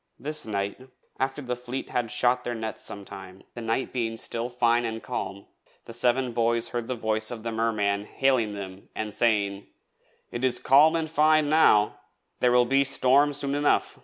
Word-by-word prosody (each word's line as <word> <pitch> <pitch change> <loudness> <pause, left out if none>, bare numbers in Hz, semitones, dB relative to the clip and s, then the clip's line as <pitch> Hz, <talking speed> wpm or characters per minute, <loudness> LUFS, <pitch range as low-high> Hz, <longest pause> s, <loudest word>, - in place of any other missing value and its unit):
This 150 -1 -1
night, 100 +2 -3 0.4
after 135 +2 -2
the 125 -1 -3
Fleet 125 +2 -6
had 120 -2 -1
shot 125 +2 +1
their 120 -1 -3
nets 110 -1 -4
sometime, 95 -1 -7
the 120 - -7
night 115 +3 -2
being 115 -3 -2
still 115 +1 -4
fine 120 -1 +2
and 115 -1 -4
calm, 100 -5 -5 0.4
the 115 - -9
Seven 125 +2 +2
Boys 115 0 0
heard 120 -1 -4
the 130 - -2
voice 110 -1 -1
of 115 -3 -7
the 115 - -3
Merman 105 -3 0
hailing 125 -4 +1
them 95 -1 -9
and 110 -1 -4
saying: 100 -3 0 0.6
'It 120 - -5
is 125 -2 +3
calm 150 +5 +5
and 160 -1 -1
fine 155 -1 +3
now; 105 -9 +4 0.4
there 125 - +3
will 125 0 +4
be 135 +2 +3
storm 140 +1 +3
enough 145 +1 +1
soon!' - - -19
120 Hz, 180 wpm, -26 LUFS, 110-130 Hz, 0.6 s, calm